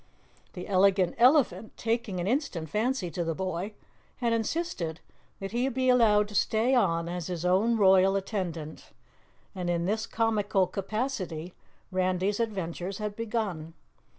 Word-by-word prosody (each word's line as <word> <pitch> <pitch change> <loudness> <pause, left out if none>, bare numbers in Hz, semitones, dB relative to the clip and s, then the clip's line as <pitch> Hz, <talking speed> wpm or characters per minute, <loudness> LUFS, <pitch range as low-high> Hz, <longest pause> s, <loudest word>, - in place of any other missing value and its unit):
The 180 - -7
Elegant 190 -2 +3
Elephant, 235 - +3
taking 225 -4 -1
an 175 - -2
instant 195 - -1
fancy 220 -4 0
to 175 - -2
the 165 -1 -2
boy, 185 +3 -3 0.4
had 235 -2 0
insisted 225 - -2 0.4
that 195 0 -5
he 245 +3 0
be 260 0 0
allowed 215 -4 +5
to - - -10
stay 220 +5 +2
on 170 -9 +2
as 175 -1 -4
his 175 -2 -4
own 205 +6 +3
royal 190 -1 +5
attendant, 180 -6 -4 0.6
and 180 -3 -3
in 170 0 0
this 220 +3 -1
comical 210 -4 +1
capacity 185 - -4 0.4
Randy's 185 +2 0
adventures 190 -4 -3
had 210 -1 -4
begun. 210 -8 -3
195 Hz, 140 wpm, -28 LUFS, 180-225 Hz, 0.6 s, allowed